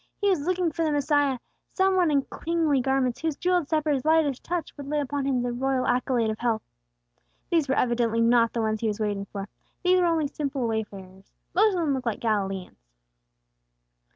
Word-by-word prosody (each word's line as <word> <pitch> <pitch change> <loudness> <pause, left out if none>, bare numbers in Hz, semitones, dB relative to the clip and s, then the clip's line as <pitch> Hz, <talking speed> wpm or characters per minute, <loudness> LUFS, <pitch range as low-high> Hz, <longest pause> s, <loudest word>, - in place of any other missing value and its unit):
He 405 - +2
was 360 - +1
looking 360 -2 +1
for 330 +2 -2
the 310 - +1
Messiah, 290 -2 +2 0.4
some 380 0 +2
one 360 -3 +3
in 280 -2 +2 0.2
kingly 320 -5 +2
garments, 265 -2 0
whose 320 -3 -1
jewelled 355 -2 0
sceptre's 300 -4 +1
lightest 310 -4 +2
touch 350 -1 -4
would 285 -2 -8
lay 300 +1 0
upon 285 0 -2
him 260 -3 +1
the 245 - -1
royal 260 +1 0
accolade 245 -2 +1
of 215 - -6
health. 230 -2 0 0.9
These 320 -5 +2
were 265 - +2
evidently 235 -2 +1
not 230 0 +4
the 235 - -2
ones 220 -1 -1
he 225 - 0
was 210 0 -2
waiting 205 -2 -2
for. 200 0 -6 0.4
These 365 0 +4
were 355 - +3
only 325 -2 +1
simple 280 -2 -3
wayfarers; 195 -4 -6 0.2
most 415 +2 +4
of 350 - 0
them 300 -4 +1
looked 255 -2 -3
like 225 - -1
Galileans. 195 - -2
270 Hz, 195 wpm, -26 LUFS, 230-315 Hz, 0.9 s, not